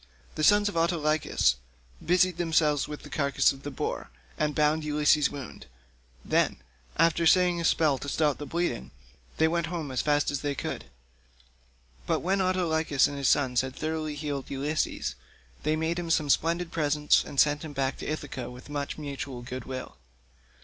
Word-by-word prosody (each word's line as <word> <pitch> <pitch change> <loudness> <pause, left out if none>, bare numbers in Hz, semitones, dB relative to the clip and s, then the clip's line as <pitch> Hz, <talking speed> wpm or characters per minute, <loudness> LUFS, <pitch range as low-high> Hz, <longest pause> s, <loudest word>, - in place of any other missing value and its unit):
The 155 - -3
sons 205 +4 +5
of 205 - -3
Autolycus 155 - +2 0.5
busied 180 0 +3
themselves 160 -4 +2
with 150 0 -7
the 145 - -10
carcass 140 -2 +2
of 135 - -10
the 145 - -5
boar, 135 - -4 0.3
and 150 -1 -1
bound 155 +1 +2
Ulysses' 150 -1 +3
wound; 140 -4 -9 0.6
then, - - +2 0.4
after 165 0 +3
saying 180 -1 +4
a - - -3
spell 155 -5 +2
to 140 - -5
stop 150 -1 +1
the 145 - -6
bleeding, 170 - -2 0.5
they 160 - +4
went 170 0 0
home 160 -5 -4
as 130 - 0
fast 145 -1 +1
as 140 - -3
they 145 -1 -2
could. - - -4 1.2
But - - +1
when 190 +2 +1
Autolycus 165 -6 +2
and 145 - -2
his 140 -2 +1
sons 130 -4 +3
had 130 0 -6
thoroughly 155 -1 -3
healed 145 -2 -4
Ulysses, 145 - -2 0.5
they 155 +1 +1
made 160 +2 -1
him 170 -1 -4
some 155 -3 +2
splendid 170 +3 +1
presents, 150 -2 +2
and 140 - -5
sent 145 0 +4
him 155 -2 -7
back 135 -1 -1
to - - -6
Ithaca 135 -5 -4
with 125 +3 -12
much 145 0 -3
mutual 140 -4 -6
good 125 0 -6
will. 130 - -7
150 Hz, 175 wpm, -28 LUFS, 140-165 Hz, 1.2 s, sons